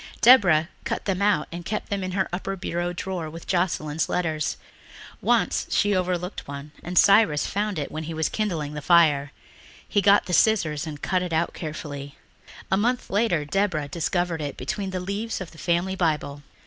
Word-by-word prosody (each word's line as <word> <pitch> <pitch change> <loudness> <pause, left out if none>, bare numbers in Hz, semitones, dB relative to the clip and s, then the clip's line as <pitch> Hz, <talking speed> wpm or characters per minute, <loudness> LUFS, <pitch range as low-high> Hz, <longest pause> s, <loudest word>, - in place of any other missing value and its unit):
Deborah 185 -11 +6 0.2
cut - - -3
them 195 -1 -1
out 200 -6 +2
and 175 +1 -6
kept 210 +5 -4
them 200 -1 -1
in 185 0 -4
her 190 0 +1
upper 195 +2 -3
bureau 175 -1 -2
drawer 175 -2 -4
with 165 +2 -10
Joscelyn's 165 -4 0
letters. 160 -4 -1 0.6
Once - - +1
she 205 -1 +2
overlooked 180 0 -2
one 140 +1 -7
and 175 +1 -5
Cyrus 200 -7 +5
found 205 -1 -2
it 145 - -3
when 155 +1 -5
he 165 - -5
was 160 -1 +1
kindling 165 -9 -2
the 150 - -5
fire. 145 -4 +4 0.6
He 205 - +2
got 200 0 +5
the 180 - -4
scissors 165 -7 +2
and 150 -2 -8
cut 185 0 +1
it 180 -2 -3
out 160 +2 0
carefully. 145 -3 -7 0.5
A 190 - +4
month 245 +4 0
later 195 -7 +1
Deborah 155 -2 0
discovered 170 +1 -1
it 145 -2 -4
between 190 +10 -3
the 185 -1 -3
leaves 200 +5 -3
of 185 -3 -7
the 160 - -15
family 175 +2 0
Bible. 150 -5 -1
175 Hz, 185 wpm, -25 LUFS, 155-195 Hz, 0.6 s, Deborah